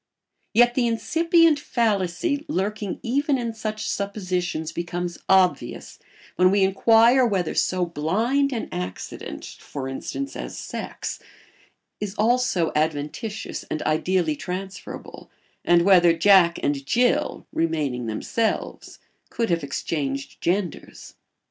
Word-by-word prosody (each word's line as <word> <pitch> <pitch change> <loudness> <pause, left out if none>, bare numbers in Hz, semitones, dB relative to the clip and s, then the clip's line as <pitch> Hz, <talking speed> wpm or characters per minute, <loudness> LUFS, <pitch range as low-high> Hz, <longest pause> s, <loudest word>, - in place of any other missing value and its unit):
Yet 240 +1 +6
the 245 -1 +1
incipient 330 +6 +3
fallacy 230 - 0
lurking 205 -4 -2
even 280 +4 +1
in 235 -2 -3
such 215 -1 -4
suppositions 180 -5 -2
becomes 175 0 -4
obvious 190 -2 +1 0.4
when 185 0 +5
we 195 +1 +3
inquire 230 +6 +5
whether 195 -8 0
so 185 -1 +1
blind 220 - 0
an 235 -4 -3
accident, 90 +1 -6
for 135 -2 -7
instance, 275 - -5
as - - -6
sex - - -5 0.8
is 205 -1 -4
also 220 -6 +2
adventitious 155 +8 -2
and 155 - -3
ideally 160 +1 +1
transferable 185 +3 -7 0.3
and 175 0 +4
whether 175 -3 +5
Jack 175 -1 +5
and 140 -1 0
Jill, 250 - +1
remaining 150 -7 -1
themselves, 215 - -2 0.3
could 230 -5 -1
have 165 -2 +1
exchanged 140 -1 -3
genders. 180 -1 -3
190 Hz, 110 wpm, -24 LUFS, 165-230 Hz, 0.8 s, Yet